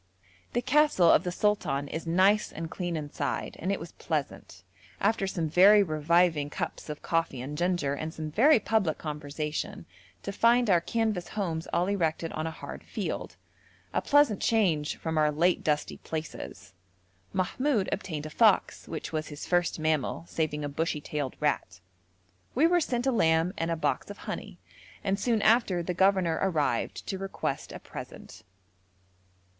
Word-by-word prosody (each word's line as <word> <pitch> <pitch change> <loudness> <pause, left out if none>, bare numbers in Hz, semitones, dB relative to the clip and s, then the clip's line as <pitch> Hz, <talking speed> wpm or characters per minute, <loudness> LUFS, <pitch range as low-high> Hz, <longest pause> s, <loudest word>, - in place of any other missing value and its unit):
The 240 - 0
castle 260 - +4
of 160 - +5
the 180 - -2
sultan 175 -8 0
is 160 +3 -5
nice 190 +5 +3
and 165 +1 -6
clean 175 -2 -3
inside, 145 -2 -3
and 185 - -1
it 200 - -1
was 165 - -8
pleasant, - - -4 0.4
after 210 -3 +1
some 170 -4 -2
very 200 +6 +7
reviving 160 -1 +2
cups 150 - -5
of 150 - -6
coffee 165 -6 0
and 135 +4 -5
ginger, 175 -4 0
and 155 +3 -4
some 155 -1 -6
very 265 - +5
public 205 -8 +1
conversation, 150 0 -4 0.4
to 200 - -3
find 235 +2 +3
our 175 -2 +5
canvas 220 -4 -1
homes 170 -6 -3
all 175 - +2
erected 165 -4 -1
on 155 +1 -2
a - - -1
hard 160 - -8
field - - -4 0.6
a - - +1
pleasant 290 -8 +3
change 175 -10 +2
from 160 -1 -2
our 150 -1 +3
late 170 +4 +2
dusty 150 -1 0
places. 155 -10 -7 0.6
Mahmoud 210 +4 0
obtained 160 -7 -3
a 155 - -7
fox, 215 +2 +3
which 160 - -5
was 155 -1 -2
his 150 0 -7
first 175 -1 +1
mammal, 155 -1 -1
saving 150 -2 -2
a - - -1
bushy 155 +2 -1
tailed 145 -2 -4
rat. 140 -11 -1 0.8
We 285 +6 +4
were 350 +1 +4
sent 245 -4 -1
a 265 - +3
lamb 165 -5 +2
and 165 - -2
a 165 - +1
box 160 - -1
of - - -8
honey, - - -6 0.5
and 195 0 0
soon 225 -1 +1
after 215 -6 +3
the 180 - -2
governor 190 -3 +2
arrived 150 -10 0
to 190 - -4
request 195 0 -4
a - - -6
present. - - -10
170 Hz, 165 wpm, -28 LUFS, 155-200 Hz, 0.8 s, very